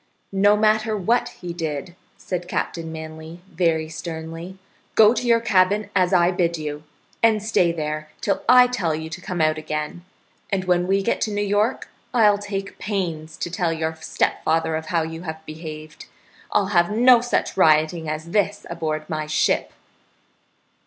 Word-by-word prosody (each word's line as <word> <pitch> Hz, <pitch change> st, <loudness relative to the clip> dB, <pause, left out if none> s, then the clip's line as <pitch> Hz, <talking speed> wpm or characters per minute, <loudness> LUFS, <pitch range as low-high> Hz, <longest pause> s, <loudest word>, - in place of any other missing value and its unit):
"No 205 Hz, +2 st, +4 dB
matter 215 Hz, 0 st, +2 dB
what 240 Hz, +5 st, +1 dB
he 175 Hz, -6 st, -8 dB
did," 165 Hz, 0 st, -4 dB, 0.2 s
said 175 Hz, -1 st, -4 dB
Captain 165 Hz, -2 st, -3 dB
Manly, 160 Hz, +1 st, -8 dB
very 165 Hz, -2 st, +1 dB
sternly. 165 Hz, +2 st, -7 dB, 0.4 s
"Go 220 Hz, 0 st, +7 dB
to 250 Hz, -, -2 dB
your 230 Hz, -1 st, +5 dB
cabin, 205 Hz, -1 st, +2 dB
as 185 Hz, -1 st, +3 dB
I 175 Hz, -1 st, +4 dB
bid 170 Hz, -2 st, 0 dB
you, 150 Hz, -1 st, -5 dB, 0.4 s
and 220 Hz, -2 st, +3 dB
stay 185 Hz, -6 st, +2 dB
there 155 Hz, -1 st, -4 dB
till 200 Hz, -, -1 dB
I 250 Hz, 0 st, +8 dB
tell 190 Hz, -11 st, -1 dB
you 160 Hz, +1 st, -6 dB
to 180 Hz, -, -7 dB
come 180 Hz, -2 st, -3 dB
out 155 Hz, 0 st, +2 dB
again, 155 Hz, +2 st, -4 dB, 0.5 s
and 190 Hz, -2 st, -1 dB
when 180 Hz, 0 st, +2 dB
we 195 Hz, +1 st, +2 dB
get 235 Hz, -, 0 dB
to 215 Hz, -, 0 dB
New 205 Hz, 0 st, -1 dB
York 205 Hz, +4 st, 0 dB, 0.3 s
I'll 210 Hz, -3 st, +5 dB
take 200 Hz, -1 st, -5 dB
pains 165 Hz, -6 st, -3 dB
to 175 Hz, -, -4 dB
tell 175 Hz, -3 st, 0 dB
your 160 Hz, 0 st, -2 dB
stepfather 160 Hz, 0 st, 0 dB
of 160 Hz, 0 st, -4 dB
how 165 Hz, 0 st, +1 dB
you 160 Hz, +1 st, -6 dB
have 160 Hz, -2 st, -7 dB
behaved. 155 Hz, -1 st, -9 dB, 0.4 s
I'll 195 Hz, -, +2 dB
have 175 Hz, -1 st, +4 dB
no 240 Hz, +3 st, +6 dB
such 245 Hz, -, -1 dB
rioting 160 Hz, -1 st, +3 dB
as 155 Hz, +2 st, -5 dB
this 205 Hz, 0 st, 0 dB
aboard 155 Hz, -2 st, -3 dB
my 155 Hz, -1 st, -3 dB
ship." 155 Hz, 0 st, +1 dB
175 Hz, 165 wpm, -22 LUFS, 160-205 Hz, 0.5 s, I